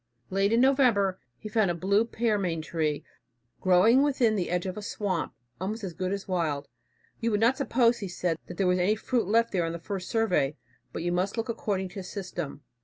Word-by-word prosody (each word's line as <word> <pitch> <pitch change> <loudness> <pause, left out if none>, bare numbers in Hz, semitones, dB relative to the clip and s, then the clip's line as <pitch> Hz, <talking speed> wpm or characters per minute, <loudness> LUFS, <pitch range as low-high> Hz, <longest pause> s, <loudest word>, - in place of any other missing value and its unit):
Late 195 +2 +2
in 230 +1 +4
November 245 -8 +3 0.2
he 215 - -8
found 215 -3 +2
a 175 - 0
blue 200 +5 +2
pearmain 205 -8 -1
tree 155 -2 -1 0.6
growing 190 +8 +5
within 260 -6 +2
the 180 -4 -1
edge 180 +1 -1
of 185 -1 -3
a 210 - -6
swamp, 200 -4 -2 0.2
almost 210 +4 -3
as 185 -3 -4
good 185 +2 -2
as 200 0 -4
wild. 155 -6 -1 0.5
"You 230 - 0
would 210 -2 +1
not 235 +4 +4
suppose," 240 -4 +2
he 200 - -4
says, 175 -2 -1
"that 175 - -8
there 195 - +1
was 180 0 +3
any 195 +4 +3
fruit 225 -1 -1
left 230 +3 +3
there 180 -3 +1
on 165 0 -2
the - - -3
first 185 +2 -5
survey, 180 - +1 0.4
but - - -5
you 175 - 0
must 185 +5 -1
look 225 +1 -2
according 200 -4 -2
to 195 - -7
system. 180 -7 -6
195 Hz, 210 wpm, -28 LUFS, 180-225 Hz, 0.6 s, growing